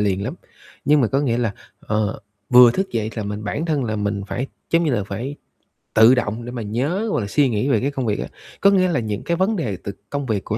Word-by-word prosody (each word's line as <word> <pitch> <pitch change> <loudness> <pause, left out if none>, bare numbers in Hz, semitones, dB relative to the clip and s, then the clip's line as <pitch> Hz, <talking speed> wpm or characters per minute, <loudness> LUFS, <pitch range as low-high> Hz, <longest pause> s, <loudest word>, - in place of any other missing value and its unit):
liền 100 -2 +1
lắm, - - -3 0.5
nhưng 150 0 +4
mà 125 - +3
có 135 - +1
nghĩa 120 -5 0
là, 115 -4 0 0.3
ờ, 105 -1 -1 0.3
vừa 125 -1 +9
thức 190 +10 -2
dậy 110 -1 -1
là 110 - -3
mình 105 +1 -5
bản 145 +10 -2
thân 150 -5 0
là 110 -2 -2
mình 100 -1 -2
phải, 130 +6 -3 0.2
giống 165 +1 +3
như 150 - +1
là, 105 -4 0
phải 120 +9 -5 0.6
tự 110 +4 +7
động 115 -1 -2
để 120 - -6
mà 120 - -5
nhớ, 135 - -1
hoặc - - +1
là 100 - -3
suy 140 +6 +2
nghĩ 115 +4 0
về 115 - +3
cái 140 +3 0
công 135 -3 -3
việc 105 -2 0
á. - - -3 0.3
Có 200 - +7
nghĩa 185 -2 +4
là 170 -7 +1
những 105 -3 -3
cái 170 - -1
vấn 190 +5 +1
đề 115 - -2
từ 100 - -4 0.2
công 145 -1 -3
việc 110 -6 -1
của 105 - -2
120 Hz, 265 wpm, -21 LUFS, 105-145 Hz, 0.6 s, vừa